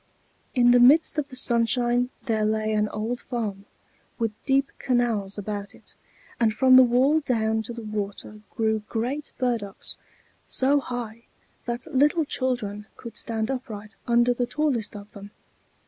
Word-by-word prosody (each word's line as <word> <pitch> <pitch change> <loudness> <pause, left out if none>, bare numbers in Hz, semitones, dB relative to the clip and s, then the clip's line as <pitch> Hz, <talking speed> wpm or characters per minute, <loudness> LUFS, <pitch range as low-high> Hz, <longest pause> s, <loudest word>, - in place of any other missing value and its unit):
In 245 -1 +5
the 245 - +6
midst 295 +5 +5
of 285 - -3
the 260 - -10
sunshine 240 0 +2
there 220 -2 0
lay 215 0 0
an 210 0 +1
old 225 +3 -3
farm, 210 -5 -4 0.5
with 230 -2 -1 0.2
deep 275 0 +2
canals 230 -6 0
about 205 0 -5
it; - - -14 0.5
and 220 -2 +2
from 255 +2 +6
the 260 - +10
wall 260 +5 +4
down 220 -6 0
to 220 - -7
the 235 -1 -7
water 210 0 -5
grew 220 -2 0
great 255 +6 -3
burdocks, 235 -6 -2 0.5
so 275 +2 +3
high 235 -3 -6 0.4
that 240 +1 -3
little 295 +4 +3
children 220 -7 -3
could 230 -2 -10
stand 225 +1 -2
upright 215 -5 -6
under 240 +1 +4
the 245 0 -1
tallest 260 -9 -1
of 205 0 -10
them. 200 -1 -11
235 Hz, 150 wpm, -25 LUFS, 215-255 Hz, 0.5 s, the